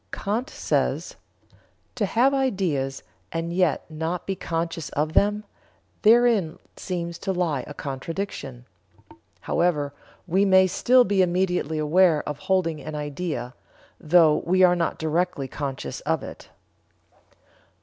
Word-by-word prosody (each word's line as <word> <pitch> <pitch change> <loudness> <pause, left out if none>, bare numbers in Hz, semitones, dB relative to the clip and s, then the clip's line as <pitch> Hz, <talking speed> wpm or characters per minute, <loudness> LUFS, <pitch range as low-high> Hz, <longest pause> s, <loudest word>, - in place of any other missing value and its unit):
Kant 220 +6 -2
says: - - -1 0.8
"To 215 -5 -1
have 245 +7 +3
ideas 185 - -1 0.3
and 165 +1 -3
yet 180 -4 +1
not 160 +2 -4
be 195 - -2
conscious 165 -2 -3
of 155 +2 -2
them 210 +3 +2 0.6
therein 220 -7 +4 0.2
seems 170 -2 -5
to 195 - -2
lie 170 -8 -1
a 145 - -9
contradiction. 135 -3 -5 0.8
However, 150 -5 0 0.3
we 190 +3 +2
may 190 -1 +6
still 250 +7 +4
be 195 -3 +2
immediately 180 -3 0
aware 155 +1 +3
of 150 -1 -4
holding 165 -2 0
an 155 0 -6
idea, 150 -3 -4 0.5
though 160 -1 +4
we 185 +2 +3
are 180 -1 +6
not 170 -2 -1
directly 160 -3 -1
conscious 135 -1 -5
of - - -1
it." - - -10
170 Hz, 125 wpm, -24 LUFS, 150-190 Hz, 0.8 s, may